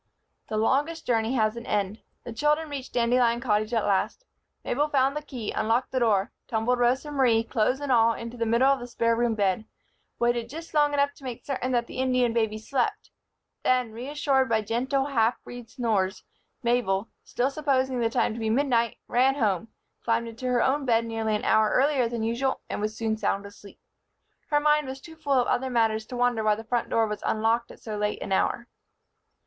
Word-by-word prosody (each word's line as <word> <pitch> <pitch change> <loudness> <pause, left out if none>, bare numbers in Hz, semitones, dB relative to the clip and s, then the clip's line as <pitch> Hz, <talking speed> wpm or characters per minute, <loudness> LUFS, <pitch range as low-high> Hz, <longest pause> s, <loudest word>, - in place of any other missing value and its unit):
The 215 - -2
longest 290 +9 0
journey 230 +1 +1
has 215 -2 +1
an 235 0 -8
end. 205 +1 -1 0.2
The 240 - -7
children 300 +5 +1
reached 275 -2 -6
Dandelion 235 0 +2
Cottage 215 -2 0
at 225 -3 +1
last. 200 - 0 0.4
Mabel 290 +4 +1
found 275 -1 +2
the 300 - -2
key, 255 -7 -6
unlocked 230 +4 0
the 260 - 0
door, 215 -2 +2 0.2
tumbled 240 +2 0
Rosa 255 +5 +1
Marie, 245 -5 +3
clothes 230 +3 0
and 285 -2 -3
all, 230 -1 +5
into 230 +1 -7
the 230 -1 -2
middle 240 +4 +4
of 275 - -3
the 245 - -7
spare 230 -1 +1
room 235 -1 +1
bed; 200 0 +1 0.5
waited 240 -1 0
just 325 +5 -9
long 295 -1 +3
enough 285 0 +2
to 280 - -19
make 250 -3 -7
certain 260 -2 -2
that 240 -1 +1
the 255 - -8
Indian 255 -2 +2
baby 220 -2 0
slept; 245 +4 -2 0.5
then, 250 -3 +1
reassured 265 +2 0
by 220 -1 +2
gentle, 260 +5 0
half 240 -4 +2
breed 245 -2 -10
snores, 215 -6 -1 0.4
Mabel, 230 -4 +1
still 255 +3 -1
supposing 265 -3 0
the 230 -1 +1
time 225 - +1
to 230 - -6
be 220 -1 -1
midnight, 235 -2 +1
ran 260 +2 +3
home, 215 -6 0 0.4
climbed 230 0 0
into 230 +3 -6
her 250 -1 +2
own 275 +2 +1
bed 230 -3 +2
nearly 225 -1 -1
an 210 - -3
hour 220 -1 +4
earlier 265 -3 +2
than 235 -2 -3
usual 235 +4 -1
and - - -3
was 215 +1 -3
soon 220 -1 -1
sound 200 -1 -1
asleep. 200 0 -13 0.7
Her 295 - +3
mind 300 -1 +2
was 265 +1 -6
too 320 +3 -13
full 310 -3 -2
of 245 - +2
other 260 +1 0
matters 225 -2 +1
to 250 - -6
wonder 245 -2 +1
why 215 -1 +3
the 220 - -8
front 235 +1 -1
door 225 - +2
was 210 -1 -4
unlocked 225 +2 +1
at - - -13
so 215 -2 -5
late 210 0 -1
an - - -7
hour. 235 +5 0
235 Hz, 205 wpm, -26 LUFS, 225-265 Hz, 0.7 s, all